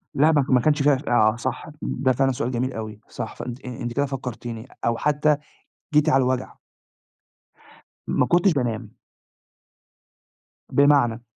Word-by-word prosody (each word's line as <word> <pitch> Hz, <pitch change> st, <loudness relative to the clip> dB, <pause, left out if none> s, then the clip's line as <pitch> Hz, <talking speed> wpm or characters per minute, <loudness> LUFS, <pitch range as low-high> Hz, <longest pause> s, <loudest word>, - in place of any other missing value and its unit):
لأ، 150 Hz, +3 st, +5 dB
ما 145 Hz, -3 st, +3 dB
ك -, -, -9 dB
ما 125 Hz, -1 st, +5 dB
كانش 145 Hz, +2 st, +2 dB
فيها 145 Hz, -1 st, +5 dB
ف 140 Hz, -, -7 dB
آه 110 Hz, -2 st, +4 dB
صح، 130 Hz, +5 st, -4 dB
ده 130 Hz, -, 0 dB
فعلًا 135 Hz, +1 st, +2 dB
سؤال 125 Hz, 0 st, -2 dB
جميل 130 Hz, +2 st, -2 dB
أوي، 110 Hz, -1 st, -6 dB
صح، 115 Hz, -2 st, -6 dB
فأنتِ 125 Hz, +2 st, -7 dB
آآ، 125 Hz, -, -5 dB
أنتِ 120 Hz, 0 st, -3 dB
كده 140 Hz, +3 st, +1 dB
فكّرتيني 125 Hz, -3 st, -6 dB, 0.2 s
أو 115 Hz, 0 st, +1 dB
حتى 150 Hz, +1 st, +2 dB, 0.6 s
جيتِ 150 Hz, 0 st, +4 dB
على 135 Hz, 0 st, +4 dB
الوجع. 130 Hz, 0 st, -2 dB, 1.5 s
ما -, -, +2 dB
كنتش 175 Hz, +2 st, +3 dB
بانام. 120 Hz, -6 st, -3 dB, 1.8 s
بمعنى، 140 Hz, -5 st, +4 dB
130 Hz, 155 wpm, -23 LUFS, 120-145 Hz, 1.8 s, لأ